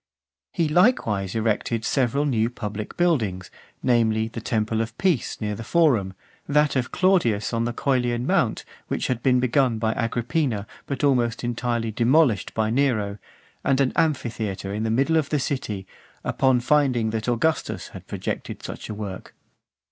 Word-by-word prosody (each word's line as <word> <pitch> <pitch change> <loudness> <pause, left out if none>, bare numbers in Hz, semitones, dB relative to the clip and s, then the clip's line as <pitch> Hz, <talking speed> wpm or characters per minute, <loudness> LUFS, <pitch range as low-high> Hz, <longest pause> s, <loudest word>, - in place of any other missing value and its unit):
IX. - - -36
He 160 -3 +1
likewise 115 - +2
erected 110 0 0
several 140 +2 +1
new 115 -5 +1
public 105 -3 -6
buildings, 110 - 0 0.3
namely, 110 -3 +2
the 115 - -7
temple 110 0 0
of 115 - -5
Peace 175 - 0
near 105 -1 -2
the 115 - -6
Forum, 115 - +2 0.3
that 150 0 +3
of 130 -2 -1
Claudius 165 - +2
on 115 0 0
the 120 - -1
(453) - - -12
Coelian 125 -3 +1
mount, - - +1 0.2
which - - -2
had 125 -2 -1
been 125 0 +3
begun 130 -1 +2
by 110 0 0
Agrippina, 120 0 -1 0.2
but 140 -1 -3
almost 125 -5 +2
entirely 120 -1 -1
demolished 120 +1 +2
by 110 0 +1
Nero; 110 -6 +1 0.4
and 135 -1 +2
an 135 -2 +2
amphitheatre 110 -10 -1
in 105 - -2
the 110 - 0
middle 135 +8 +2
of 150 -3 0
the 150 - +1
city, 110 -8 -3 0.4
upon 130 -2 +2
finding 125 -5 +2
that 110 +1 -3
Augustus 155 +7 0
had - - -11
projected - - -5
such - - -7
a 105 - -4
work. 100 -3 -7
120 Hz, 165 wpm, -24 LUFS, 110-140 Hz, 0.4 s, that